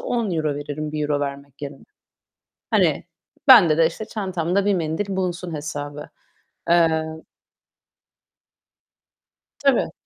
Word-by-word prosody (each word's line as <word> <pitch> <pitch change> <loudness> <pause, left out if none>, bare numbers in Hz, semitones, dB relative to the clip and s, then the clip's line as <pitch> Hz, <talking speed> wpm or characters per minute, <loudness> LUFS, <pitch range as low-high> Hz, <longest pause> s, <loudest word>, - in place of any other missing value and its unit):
€10 170 -11 -1
veririm 150 +1 -5
€1 150 -1 -1
vermek 140 0 -6
yerine. 140 -1 -7 0.9
Hani, - - +2 0.4
bende 175 -12 +8
de, 165 - +6
işte, 190 +6 -4
çantamda 190 -3 -1
bir 205 - +2
mendil 180 +4 -2
bulunsun 180 -2 -3
hesabı. 145 -1 -6 0.6
Eee 165 -2 +4 2.6
Tabii. 275 -3 +2
160 Hz, 95 wpm, -22 LUFS, 145-190 Hz, 2.6 s, bende